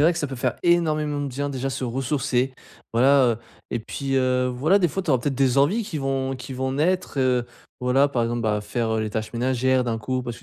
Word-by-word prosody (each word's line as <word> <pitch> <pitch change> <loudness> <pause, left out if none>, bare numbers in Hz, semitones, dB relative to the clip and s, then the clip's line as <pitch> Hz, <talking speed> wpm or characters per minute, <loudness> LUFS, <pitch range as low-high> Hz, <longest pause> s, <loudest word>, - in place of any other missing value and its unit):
vrai 165 +4 +5
que 170 - -4
ça 150 - -1
peut 135 - -6
faire 125 -1 -1
énormément 155 -4 +2
de 145 - -2
bien, 140 +2 -3
déjà, 135 0 -3
se 130 0 -3
ressourcer, 130 +1 -1 0.4
voilà. 135 +4 +5
Heu 110 - -4 0.3
et 120 - -1
puis, 135 +4 -3
heu, 130 -1 +2
voilà, 150 +11 +2
des 180 - +3
fois 190 +5 -3
tu 175 - -2
auras 130 - +4
peut-être 140 +2 -1
des 135 0 +2
envies 175 +12 +3
qui 165 -7 -5
vont 135 -1 -1
qui 125 +2 -8
vont 130 +1 -2
naître, 175 +2 0
heu, 125 -2 +2 0.3
voilà. 125 +3 +3
Par 125 -4 0
exemple, 120 0 -1
bah, 105 -2 +1
faire, 115 +1 -2
heu, 110 - 0
les 110 -1 -2
tâches 110 0 -4
ménagères 130 +1 +1
d'un 115 -2 -1
coup, 130 +3 -2
parce 120 -1 -5
que - - -15
130 Hz, 245 wpm, -24 LUFS, 125-145 Hz, 0.4 s, vrai